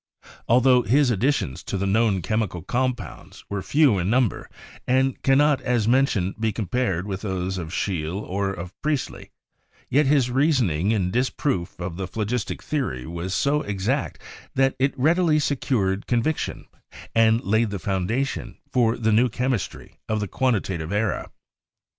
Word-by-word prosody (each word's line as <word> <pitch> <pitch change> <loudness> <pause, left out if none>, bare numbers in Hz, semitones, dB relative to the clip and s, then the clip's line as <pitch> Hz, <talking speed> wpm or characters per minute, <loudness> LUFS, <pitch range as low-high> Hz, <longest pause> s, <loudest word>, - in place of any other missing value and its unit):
Altho 125 +1 +5
his 130 +4 +3
additions 115 - 0
to 100 - -4
the 95 - -1
known 100 -2 +2
chemical 105 -6 -1
compounds 130 -1 -3
were 100 -1 -2
few 140 -4 +3
in 90 +2 -1
number, 120 -2 +1 0.4
and 130 +1 +1
cannot, 140 +1 +3
as 120 -4 0
mentioned, 115 -7 +2
be 110 0 +1
compared 100 -4 -1
with 100 -1 -4
those 95 -2 -2
of 80 -2 -5
Scheele 90 -2 -2
or 100 -1 -2
of 90 -1 -7
Priestley, 150 -3 -2 0.6
yet 145 +2 +4
his 135 -4 +3
reasoning 125 - +2
in 95 -5 +1
disproof 125 -7 -1
of 85 -1 -5
the 95 -1 -3
phlogistic 110 +3 -3
theory 130 - -2
was 85 +4 -5
so 145 +9 +2
exact 105 +7 -2 0.4
that 135 0 +2
it 135 +1 +1
rapidly 160 +3 +3
secured 120 -9 0
conviction, 125 +6 -1 0.5
and 115 0 +4
laid 110 +3 +2
the 100 - -3
foundation 100 - -2
for 120 -2 +2
the 110 -1 +1
new 120 +4 +4
chemistry 125 -1 -3
of 110 0 0
the 105 - -2
quan 130 +4 +1
titative 85 -5 -3
era. 105 +1 -1
110 Hz, 150 wpm, -24 LUFS, 95-130 Hz, 0.6 s, Altho